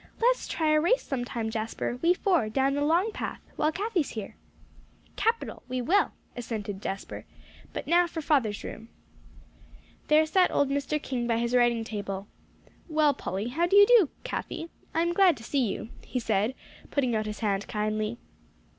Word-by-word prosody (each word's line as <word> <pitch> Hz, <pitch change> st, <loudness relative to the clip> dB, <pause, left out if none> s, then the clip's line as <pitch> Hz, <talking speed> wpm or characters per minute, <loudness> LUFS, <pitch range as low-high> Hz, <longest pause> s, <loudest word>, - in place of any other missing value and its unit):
"Let's -, -, +2 dB
try 315 Hz, -2 st, +1 dB
a 305 Hz, -, +4 dB
race 460 Hz, +10 st, +2 dB
sometime, 245 Hz, -4 st, -3 dB
Jasper; 225 Hz, +2 st, -3 dB
we 345 Hz, +2 st, +4 dB
four, 355 Hz, -, +1 dB
down 270 Hz, +4 st, +1 dB
the 285 Hz, -, -1 dB
Long 345 Hz, +8 st, +2 dB
Path, -, -, -5 dB, 0.2 s
while 305 Hz, -, +1 dB
Cathie's 385 Hz, -3 st, -1 dB
here." 215 Hz, -3 st, -6 dB, 0.8 s
"Capital! 460 Hz, +1 st, -1 dB
We 255 Hz, 0 st, -2 dB
will," 365 Hz, +12 st, +2 dB, 0.2 s
assented 210 Hz, -5 st, -5 dB
Jasper, 195 Hz, -1 st, -5 dB, 0.5 s
"but -, -, -5 dB
now 345 Hz, +2 st, +4 dB
for 330 Hz, -, -5 dB
father's 270 Hz, -10 st, +1 dB
room." 225 Hz, -, -8 dB, 1.2 s
There 305 Hz, +1 st, +5 dB
sat 360 Hz, +4 st, +3 dB
old 285 Hz, -1 st, +1 dB
Mr. 285 Hz, +2 st, -1 dB
King 250 Hz, -4 st, -3 dB
by 230 Hz, -1 st, +2 dB
his 235 Hz, +1 st, -1 dB
writing 240 Hz, -2 st, +3 dB
table. 200 Hz, -3 st, -5 dB, 0.6 s
"Well, 305 Hz, -2 st, +3 dB
Polly 200 Hz, +1 st, -4 dB
how 335 Hz, +7 st, +1 dB
do 390 Hz, -, +2 dB
you 405 Hz, 0 st, +10 dB
do, 440 Hz, -, +6 dB
Cathie? 330 Hz, -, -5 dB, 0.2 s
I 330 Hz, -, +1 dB
am 340 Hz, 0 st, 0 dB
glad 365 Hz, -4 st, +5 dB
to 225 Hz, -, -12 dB
see 245 Hz, -3 st, 0 dB
you," 220 Hz, -, -6 dB
he 255 Hz, -, -3 dB
said, 220 Hz, +1 st, 0 dB, 0.3 s
putting 255 Hz, -5 st, +1 dB
out 215 Hz, 0 st, -1 dB
his 210 Hz, +1 st, -6 dB
hand 200 Hz, -2 st, 0 dB
kindly. 215 Hz, +1 st, -2 dB
265 Hz, 170 wpm, -28 LUFS, 220-335 Hz, 1.2 s, you